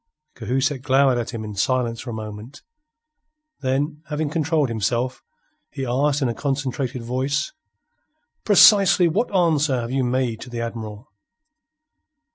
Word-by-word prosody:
Cahusac 130 Hz, +3 st, -1 dB
glowered 135 Hz, -2 st, +3 dB
at 120 Hz, -, -4 dB
him 115 Hz, -2 st, -5 dB
in 105 Hz, -1 st, -6 dB
silence 115 Hz, +3 st, 0 dB
for 130 Hz, -, -8 dB
a -, -, -4 dB
moment. 110 Hz, +5 st, -8 dB, 1.0 s
Then, 145 Hz, +3 st, -1 dB
having 150 Hz, -1 st, -2 dB
controlled 155 Hz, -3 st, +1 dB
himself, 120 Hz, +3 st, -2 dB, 0.5 s
he 135 Hz, -2 st, -5 dB
asked 140 Hz, +4 st, +1 dB
in -, -, +2 dB
a 120 Hz, -, -1 dB
concentrated 135 Hz, -1 st, -3 dB
voice: 135 Hz, -, -2 dB, 0.9 s
"Precisely 195 Hz, -3 st, +6 dB
what 210 Hz, +9 st, 0 dB
answer 155 Hz, -8 st, +2 dB
have 120 Hz, 0 st, -4 dB
you 135 Hz, 0 st, 0 dB
make 125 Hz, -2 st, -1 dB
to 125 Hz, -, -9 dB
the 120 Hz, -1 st, -5 dB
Admiral?" 115 Hz, -1 st, -7 dB
130 Hz, 135 wpm, -22 LUFS, 120-145 Hz, 1.0 s, Precisely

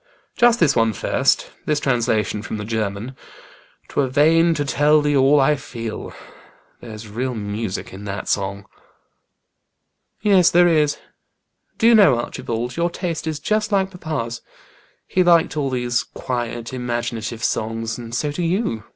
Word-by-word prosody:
"Just 240 Hz, 0 st, +4 dB
this 150 Hz, -5 st, +3 dB
one 115 Hz, -2 st, +2 dB
first -, -, 0 dB, 0.2 s
this 150 Hz, -1 st, +1 dB
translation 115 Hz, -5 st, 0 dB
from 110 Hz, -, -5 dB
the 105 Hz, -, -5 dB
German 110 Hz, +2 st, -3 dB, 0.4 s
' -, -, -29 dB
'Twere 140 Hz, -, 0 dB
vain 165 Hz, +5 st, +3 dB
to 145 Hz, -, -1 dB
tell 150 Hz, +2 st, +3 dB
thee 145 Hz, -1 st, +1 dB
all 140 Hz, +2 st, +5 dB
I 150 Hz, +2 st, +4 dB
feel.' 115 Hz, -5 st, -7 dB, 0.7 s
There's 110 Hz, -1 st, -9 dB
real 125 Hz, +4 st, -3 dB
music 105 Hz, -2 st, -4 dB
in 100 Hz, +2 st, -9 dB
that 100 Hz, 0 st, -5 dB
song." 100 Hz, 0 st, -2 dB, 1.5 s
"Yes, 195 Hz, -5 st, +4 dB
there 175 Hz, +1 st, +5 dB
is. 150 Hz, -3 st, +2 dB, 0.8 s
Do -, -, 0 dB
you 235 Hz, -, +7 dB
know, 195 Hz, -, +6 dB
Archibald, 120 Hz, +1 st, -4 dB
your 170 Hz, +1 st, +1 dB
taste 170 Hz, -2 st, -4 dB
is 155 Hz, -2 st, -2 dB
just 215 Hz, +6 st, -1 dB
like 195 Hz, -1 st, +1 dB
papa's. 145 Hz, -10 st, -4 dB, 0.6 s
He 185 Hz, -, +1 dB
liked 170 Hz, -3 st, +4 dB
all 145 Hz, -3 st, -1 dB
these 125 Hz, -2 st, 0 dB
quiet, 120 Hz, -1 st, -5 dB
imaginative 120 Hz, -2 st, -4 dB
songs, 115 Hz, +1 st, -2 dB
and 115 Hz, -1 st, -7 dB
so 145 Hz, +4 st, -1 dB
do 160 Hz, -, -4 dB
you. 170 Hz, -, -1 dB
130 Hz, 150 wpm, -21 LUFS, 115-160 Hz, 1.5 s, you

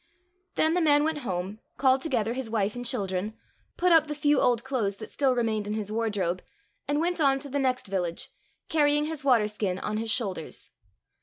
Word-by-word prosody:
" 370 Hz, +1 st, -46 dB
Then 315 Hz, +1 st, +3 dB
the 355 Hz, -, +2 dB
man 295 Hz, -2 st, +4 dB
went 315 Hz, -1 st, 0 dB
home, 195 Hz, -3 st, -4 dB, 0.2 s
called 265 Hz, 0 st, +3 dB
together 235 Hz, -7 st, 0 dB
his 255 Hz, -2 st, -4 dB
wife 215 Hz, -1 st, 0 dB
and 245 Hz, -, -5 dB
children, 200 Hz, -1 st, -2 dB, 0.4 s
put 360 Hz, 0 st, +3 dB
up 320 Hz, -2 st, +6 dB
the 300 Hz, -, -3 dB
few 295 Hz, -1 st, +3 dB
old 240 Hz, -2 st, +2 dB
clothes 235 Hz, -7 st, -1 dB
that -, -, -10 dB
still 270 Hz, -3 st, +2 dB
remained 220 Hz, -3 st, 0 dB
in 210 Hz, -, -2 dB
his 210 Hz, -1 st, -4 dB
wardrobe, 205 Hz, -6 st, -1 dB, 0.5 s
and 290 Hz, +1 st, +1 dB
went 345 Hz, +1 st, 0 dB
on 275 Hz, -2 st, +4 dB
to 280 Hz, +1 st, -8 dB
the 285 Hz, +1 st, -1 dB
next 255 Hz, -1 st, 0 dB
village, 180 Hz, -3 st, -3 dB, 0.4 s
carrying 295 Hz, -1 st, +3 dB
his 310 Hz, -3 st, -4 dB
water 245 Hz, -6 st, +4 dB
skin 205 Hz, -3 st, -2 dB
on 210 Hz, +2 st, -3 dB
his 225 Hz, +1 st, -2 dB
shoulders. 200 Hz, -9 st, -2 dB
245 Hz, 205 wpm, -27 LUFS, 210-290 Hz, 0.5 s, up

